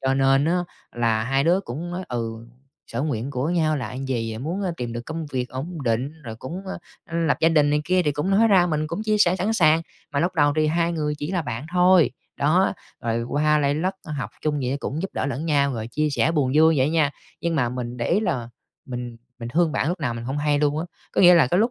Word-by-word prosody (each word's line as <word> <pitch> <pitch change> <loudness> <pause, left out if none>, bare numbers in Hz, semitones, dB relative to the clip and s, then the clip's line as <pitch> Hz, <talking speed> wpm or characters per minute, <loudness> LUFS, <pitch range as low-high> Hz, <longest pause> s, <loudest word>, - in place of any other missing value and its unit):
cho 135 0 +1
nên 135 +1 +3
á 170 +3 +2 0.3
là 115 -2 +1
hai 135 +2 +1
đứa 175 +4 +3
cũng 165 +3 -6
nói: 180 +1 -4
"ừ, 115 -1 -4 0.4
sở - - -3
nguyện 135 -4 -2
của 140 +4 -1
nhau 160 -3 +2
là 125 -5 -4
gì?" 120 -4 -3
Muốn, 170 +9 -3
a, 185 - 0
"tìm 120 -4 -4
được 120 - -4
công 160 0 -4
việc 130 -3 -3
ổn 150 +5 -6
định" 120 +4 0
rồi 115 -4 -7
cũng, 165 +11 -7
a, 190 - -4 0.4
ưm, 165 0 0
"lập 140 -4 +2
gia 165 - +5
đình" 150 -3 +3
này 150 - +2
kia 185 +2 +2
thì 150 - +1
cũng 150 +6 -2
nói 220 +4 +4
ra 185 -4 +5
mình 155 -2 -1
cũng 170 +7 -4
chia 215 -1 +1
sẻ 185 -3 +4
sẵn 195 +4 0
sàng. 165 -6 +4 0.3
Mà 140 - +1
lúc 175 +2 0
đầu 145 -3 +3
thì 155 - +3
hai 170 +2 +1
người 150 -2 -1
chỉ 150 +3 -4
là 180 -3 0
bạn 125 +1 -5
thôi, 180 -2 +5 0.3
đó, 165 +7 +3 0.3
rồi 115 0 -1
qua 150 +5 +2
lây 145 -1 +1
lất, 185 +5 -1
a, 155 - -6
học 140 -3 -4
chung 150 -1 0
vậy 130 +2 -1
cũng 155 +5 -3
giúp 195 - -3
đỡ - - -1
lẫn 140 +4 -3
nhau, 140 -3 +2
rồi 110 -1 -4
chia 155 +3 0
sẻ 145 - +2
buồn 140 -5 +1
vui 160 +1 +5
vậy 130 +3 +2
nha, 155 -3 +2 0.3
nhưng 170 -1 -1
mà 130 -6 +1
mình 125 0 -5
để 120 - -2
ý 195 +5 +3
là 125 - -2 0.4
mình 125 -2 -6 0.2
mình 115 -1 -6
thương 165 +3 +2
bạn 150 - 0
lúc 175 +1 -2
nào 125 -6 -1
mình 115 0 -6
hông 135 +4 -3
hay 145 0 +1
luôn 150 0 +1
á. 160 - -2 0.3
Có - - +1
nghĩa 180 -1 +8
là 165 - +5
cái 175 +8 +1
lúc 230 +3 +2
150 Hz, 265 wpm, -23 LUFS, 130-170 Hz, 0.4 s, nghĩa